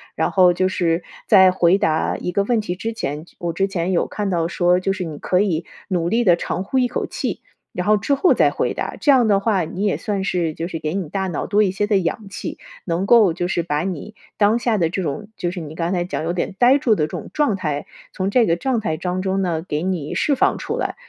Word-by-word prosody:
然 - - +1
后 180 -2 +5
就 185 +2 +1
是 170 -2 0 0.2
在 190 -4 +7
回 180 0 +3
答 160 -6 +1
一 180 - -4
个 200 +3 +1
问 230 +2 +1
题 180 -4 -4
之 225 +5 -4
前， 150 -7 -4
我 170 -1 -2
之 195 +4 +1
前 185 -2 -2
有 175 - +1
看 205 -2 -3
到 170 -3 0
说， 175 0 +2
就 195 +1 0
是 190 -1 -4
你 155 -3 -6
可 180 - 0
以 180 -5 0 0.2
努 175 -3 -1
力 235 +5 +2
地 180 -6 +5
长 175 +1 -3
呼 235 +7 -2
一 250 -1 +3
口 245 - -3
气， - - -4 0.3
然 180 - -3
后 215 0 +5
之 210 +8 0
后 280 +6 +4
再 - - +4
回 - - -1
答， - - -4
这 290 - +5
样 250 -4 +4
的 200 -2 +4
话 200 -3 +1
你 185 +5 -3
也 200 - +1
算 200 -2 -2
是 175 -4 -1
就 165 +2 -4
是 170 - -5
给 155 0 -3
你 185 -5 -3
大 190 +3 -2
脑 175 - -3
多 210 +1 +3
一 195 - +1
些 205 +2 -1
的 210 -2 +3
氧 190 +3 -2
气， - - -6 0.3
能 175 +2 -1
够 220 -7 +6
就 175 +1 -2
是 175 -1 -1
把 150 -3 -1
你 185 +3 -5 0.2
当 215 +3 +3
下 235 -2 +1
的 170 -4 +2
这 190 +3 -3
种 180 +6 -4
就 175 - -2
是 180 +1 -5
你 155 -1 -8
刚 165 +1 -2
才 175 -2 0
讲 175 - -4
有 165 - -1
点 180 +2 -2
呆 250 +3 +6
住 245 -5 +2
的 155 -7 +1
这 - - -5
种 - - -7
状 290 -9 +1
态， 150 -6 -3 0.3
从 190 0 -1
这 235 +3 +4
个 165 - +2
状 250 +6 -1
态 160 -7 -2
当中 185 +2 -1
呢， 170 -4 -1
给 150 -2 -2
你 180 -5 -2
释 290 - +1
放 - - +2
出 - - -3
来。 - - -2
185 Hz, 285 characters per minute, -21 LUFS, 170-205 Hz, 0.3 s, 在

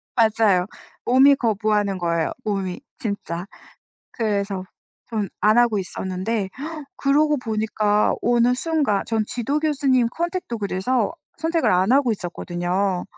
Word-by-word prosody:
맞아요. 220 -5 +3 0.4
몸이 270 +3 +6
거부하는 210 -4 0
거예요, 170 -2 0
몸이. 195 +1 -2 0.2
진짜. 195 -5 -4 0.7
그래서 200 -4 -1 0.4
전 215 -5 -2
안 215 +4 +4
하고 235 -4 +3
있었는데 190 +3 -3 0.5
그러고 295 +2 +3
보니까 215 -2 +1
어느 240 +1 +3
순간 290 -9 0
전 220 -2 0
지도 275 +5 -1
교수님 275 -5 +2
컨택도 340 -5 -3
그래서 205 +6 0 0.3
선택을 325 +1 +1
안 185 +4 +2
하고 265 -4 +4
있었거든요. 180 0 -2
215 Hz, 275 characters per minute, -22 LUFS, 195-250 Hz, 0.7 s, 몸이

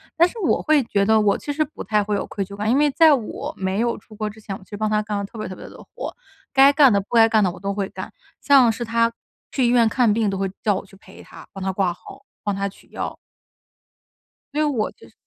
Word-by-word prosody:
但 340 +1 +5
是 465 - -13
我 365 - +1
会 300 -4 +3
觉 200 -3 0
得 220 0 +4
我 205 -1 +3
其 290 - -5
实 305 +2 +1
不 300 - -9
太 210 -1 +1
会 210 0 -1
有 - - -2
愧 200 -2 -4
疚 200 +1 -10
感， 210 +2 -2
因 255 - +3
为 295 0 +3
在 320 +1 +6
我 245 -6 -3
没 190 +2 -2
有 235 0 0
出 215 +1 -16
国 215 0 -3
之 215 - -13
前， 205 -3 -6
我 - - -18
其 - - -24
实 205 - -5
帮 215 +1 0
他 210 0 +1
干 210 -1 -3
了 200 - -3
特 220 - -12
别 215 - -4
特 185 - -7
别 - - -11
多 - - -13
的 - - -12
活。 - - -6 0.4
该 275 +1 +7
干 280 -6 +6
的 200 - +2
不 205 - -6
该 225 -1 +7
干 220 -2 +3
的 185 - +1
我 - - -12
都 200 0 -3
会 200 -1 -3
干， - - -8 0.3
像 265 -5 +5
是 235 +2 -5
他 230 +1 +2 0.4
去 260 - +1
医 235 - +3
院 235 -2 +4
看 235 -3 +2
病 220 -1 +1
都 195 - -2
会 195 -1 -2
叫 205 -2 +2
我 190 - -5
去 195 - -18
陪 - - -15
他， - - -14
帮 195 - -7
他 190 - 0
挂 190 -2 +1
号， 275 +8 -14 0.2
帮 205 -2 -1
他 200 0 -2
取 - - -20
药。 - - -5 1.4
所 300 - 0
以 - - +3
我 260 -8 0
就 - - -18
是 - - -25
215 Hz, 310 characters per minute, -22 LUFS, 200-250 Hz, 1.4 s, 该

